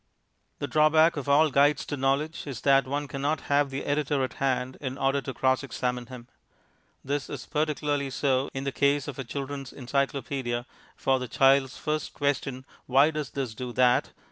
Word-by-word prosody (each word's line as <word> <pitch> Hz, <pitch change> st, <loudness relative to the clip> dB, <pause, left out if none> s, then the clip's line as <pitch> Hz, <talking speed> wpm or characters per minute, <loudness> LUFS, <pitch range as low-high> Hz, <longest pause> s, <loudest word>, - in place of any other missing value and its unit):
The -, -, -3 dB
drawback 155 Hz, +4 st, +4 dB
of 145 Hz, -2 st, -4 dB
all 150 Hz, +2 st, +5 dB
Guides 145 Hz, +2 st, +3 dB
to 145 Hz, -, -3 dB
Knowledge 140 Hz, +4 st, -1 dB
is 135 Hz, -4 st, -5 dB
that 135 Hz, -2 st, +4 dB
one 145 Hz, +2 st, -2 dB
cannot 140 Hz, +3 st, -2 dB
have 145 Hz, 0 st, +1 dB
the 135 Hz, +1 st, -5 dB
editor 145 Hz, -1 st, 0 dB
at 130 Hz, -, -3 dB
hand 130 Hz, -1 st, 0 dB
in 130 Hz, -1 st, -4 dB
order 135 Hz, +1 st, +1 dB
to 135 Hz, -, -5 dB
cross 130 Hz, 0 st, +1 dB
examine 125 Hz, -2 st, -3 dB
him. 125 Hz, -2 st, -10 dB, 0.8 s
This 140 Hz, +1 st, -2 dB
is -, -, -6 dB
particularly 150 Hz, -2 st, -1 dB
so 130 Hz, 0 st, 0 dB
in 135 Hz, -, -4 dB
the 140 Hz, -, -2 dB
case 140 Hz, +1 st, +1 dB
of 140 Hz, -2 st, -6 dB
a -, -, -2 dB
Children's 135 Hz, +1 st, -5 dB
Encyclopaedia, 135 Hz, -2 st, -2 dB, 0.3 s
for 135 Hz, -1 st, +1 dB
the 125 Hz, -, -4 dB
child's 135 Hz, +1 st, +3 dB
first 155 Hz, 0 st, -3 dB
question, 135 Hz, -2 st, -1 dB, 0.2 s
"Why 140 Hz, +4 st, +5 dB
does 150 Hz, -4 st, -4 dB
this 130 Hz, -2 st, -4 dB
do 125 Hz, +2 st, -6 dB
that?" 125 Hz, 0 st, +3 dB
140 Hz, 180 wpm, -27 LUFS, 130-145 Hz, 0.8 s, all